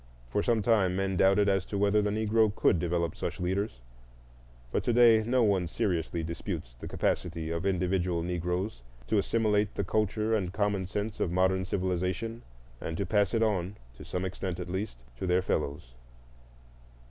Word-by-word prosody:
For 105 - +1
some 115 -2 +1
time 100 -6 +3
men 95 0 0
doubted 100 +2 +4
as 95 -2 +2
to 100 - -3
whether 100 +1 +3
the 105 - 0
Negro 110 0 +2
could 90 - +3
develop 85 0 -1
such - - -4
leaders; 95 - -2 0.9
but - - 0
to 120 - +2
day 115 -2 +6
no 120 +2 +2
one 95 -5 +2
seriously 85 -2 -1
disputes 80 -7 -5
the - - -7
capability 80 -1 -1
of 85 +3 -1
individual 90 -2 0
Negroes 90 - -2 0.2
to 110 - +2
assimilate 105 -1 +1
the 100 - -1
culture 110 +2 0
and 95 -5 0
common 100 -2 0
sense 105 +2 -3
of 85 - 0
modern 95 +1 +2
civilization, 95 +5 -2 0.4
and 80 - -4
to 100 - -1
pass 100 0 +2
it 115 - +3
on, 100 -3 0 0.2
to - - -11
some 90 +1 -3
extent 95 -1 -4
at 90 0 -5
least, 95 - -4 0.2
to - - -2
their 90 +1 +2
fellows. 70 -7 -2
95 Hz, 170 wpm, -29 LUFS, 90-105 Hz, 0.9 s, day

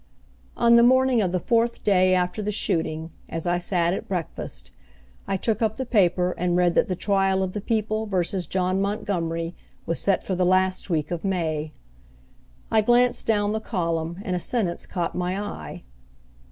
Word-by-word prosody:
On 235 0 +6
the - - +7
morning 255 0 +4
of 185 -4 0
the 185 - 0
fourth 235 +4 0
day 185 -2 +4
after 180 +3 -1
the 210 0 -2
shooting, 160 -4 -2 0.2
as 165 -1 -4
I 175 0 +1
sat 175 -1 0
at - - -5
breakfast, 65 - -5 0.6
I 195 - 0
took 220 +3 -1
up 220 -1 0
the 260 - -3
paper 180 -6 +2
and 175 0 +1
read 175 -1 +3
that - - +3
the 185 - -1
trial 195 0 +1
of 185 -1 -3
the 210 - -3
People 215 0 -1
Versus 185 -2 -1
John 185 +1 0
Montgomery 175 -5 -2 0.3
was 165 - -2
set 195 -2 +1
for 190 - -3
the 180 0 +1
last 185 +1 +2
week 155 -2 -1
of 175 -2 -3
May. 160 -5 -1 1.0
I 220 - +4
glanced 245 +2 +3
down 205 -2 +2
the 220 - -1
column 170 -5 -2
and 180 - -1
a - - -1
sentence 185 -3 -2
caught 175 -3 -2
my 180 +2 -2
eye. 80 - -7
185 Hz, 180 wpm, -24 LUFS, 175-210 Hz, 1.0 s, the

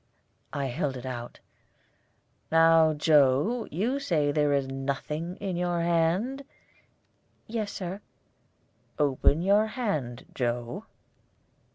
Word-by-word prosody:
I 140 -1 -2
held 130 +1 -2
it 125 - -9
out. 120 -2 -6 1.1
"Now, 165 -1 +5
Joe, 150 - +3
you 230 - -1
say 165 - +1
that - - 0
there 150 -1 +2
is 140 -2 +1
nothing 140 +5 -3
in 190 -2 -4
your 175 -1 0
hand?" 175 +11 +1 1.0
"Yes, 215 -2 -3
Sir." 190 +2 -5 1.0
"Open 145 +2 +2
your 205 +3 +4
hand, 155 - -3
Joe." 120 - -3
160 Hz, 105 wpm, -28 LUFS, 135-195 Hz, 1.1 s, Now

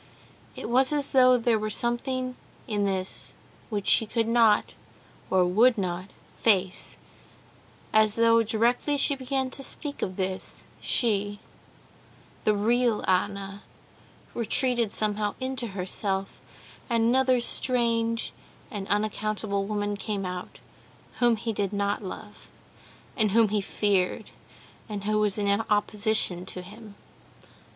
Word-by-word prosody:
It - - -6
was 260 +4 +3
as 290 -2 0
though 255 -1 +6
there 230 -2 +2
were 215 0 -2
something 255 +3 -1 0.3
in 205 -2 0
this 190 -1 -3 0.4
which 205 -3 -3
she 225 - +4
could 225 +1 0
not 230 -2 +4 0.6
or 185 -1 +4
would 225 +7 +4
not 185 0 -3 0.3
face, 190 -4 +1 1.0
as 215 -1 +4
though 230 0 +5
directly 235 +6 +1
she 280 - +2
began 265 -1 -2
to 275 - -5
speak 285 +2 -4
of 185 - -2
this, 190 0 -4 0.2
she, 205 -3 +1 1.1
the 215 - +4
real 230 +2 +1
Anna, 195 +1 -1 0.7
retreated 235 -1 +2
somehow 210 -1 0
into 260 -2 -3
herself, 195 0 -3 0.5
and 230 -1 +2
another 255 +2 +3
strange 230 -2 0 0.4
and 200 -4 -5
unaccountable 210 -1 -1
woman 205 0 -2
came 200 -1 -3
out, 180 0 -6 0.6
whom 240 -1 +4
he 225 +1 -3
did 200 -2 -1
not 200 +1 -1
love, 205 +2 -9 0.7
and 215 -4 +1
whom 225 -1 +5
he 210 0 +1
feared, 195 -2 0 0.6
and 205 -2 -5
who 215 +1 +1
was 210 -1 +2
in 205 -1 0 0.2
opposition 210 -3 +1
to 180 - -6
him. 210 +2 -12
215 Hz, 125 wpm, -27 LUFS, 200-235 Hz, 1.1 s, though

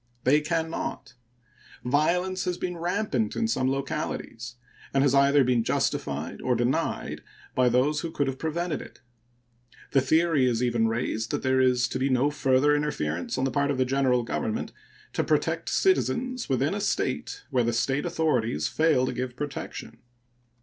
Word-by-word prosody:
They 145 +4 +4
can 160 +1 -1
not. 135 -5 -5 0.7
Violence 180 +8 +1
has 180 -1 -1
been 180 -1 -3
rampant 200 +6 -1
in 230 - 0
some 130 - +1
localities, 135 -4 -4 0.4
and 135 - +4
has 140 -2 +3
either 140 0 +5
been 125 -2 +2
justified - - -2
or - - +1
denied - - -1 0.3
by 125 -1 +3
those 135 +5 +2
who 165 - -4
could 145 -3 -1
have 135 -1 -4
prevented 165 +1 -2
it. - - -13 0.9
The 135 - +4
theory 160 -2 +3
is 120 0 0
even 120 -2 +2
raised 110 -1 -2
that - - -2
there 130 0 +3
is 125 -2 +3
to 130 - -3
be 135 +1 +1
no 130 +3 +2
further 135 +1 +3
interference 90 - -2
on 130 - 0
the 135 - +1
part 140 +2 +1
of 140 - 0
the 130 - +2
General 130 -2 +2
Government 225 - -3 0.4
to - - 0
protect - - 0
citizens 255 - +1
within 135 +5 +1
a 205 - -2
State 405 - -2
where 125 - +2
the 120 - +1
State 135 +5 0
authorities 130 - 0
fail 155 -5 +2
to 130 - -2
give 125 0 -4
protection. 145 +1 -6
140 Hz, 170 wpm, -26 LUFS, 125-160 Hz, 0.9 s, either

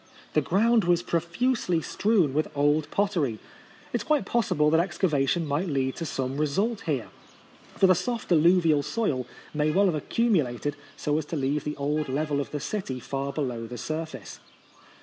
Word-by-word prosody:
The 155 - +3
ground 220 +7 +3
was 175 0 +3
profuse 180 +10 -1
ly 170 -2 +3
strewn 195 -6 +1
with 155 +2 +1
old 145 +1 +2
pottery. 185 - 0 0.6
It - - +3
is - - -5
quite 300 +2 +1
possible 150 -10 +2
that 160 - +4
excavation 170 -3 +1
might 150 +6 -1
lead 135 -4 -1
to 165 - -3
some 135 0 -3
result 195 +10 0
here, 140 -7 -1 0.7
for - - +4
the 185 - +7
soft 225 +6 -3
alluvial 165 -2 +5
soil 140 - -1 0.3
may 150 0 +1
well 195 +6 +3
have 185 - +2
accumulated 150 - 0 0.2
so 150 +1 0
as 155 - -5
to 165 - -5
leave 145 +1 -1
the 150 - -3
old 145 +1 -1
level 145 +1 0
of - - -6
the 150 - -4
city 145 -4 -4
far 140 +2 -3
below 125 -6 -3
the 120 +1 -7
sur 155 +6 -3
face. 130 -9 -10
155 Hz, 180 wpm, -27 LUFS, 140-185 Hz, 0.7 s, the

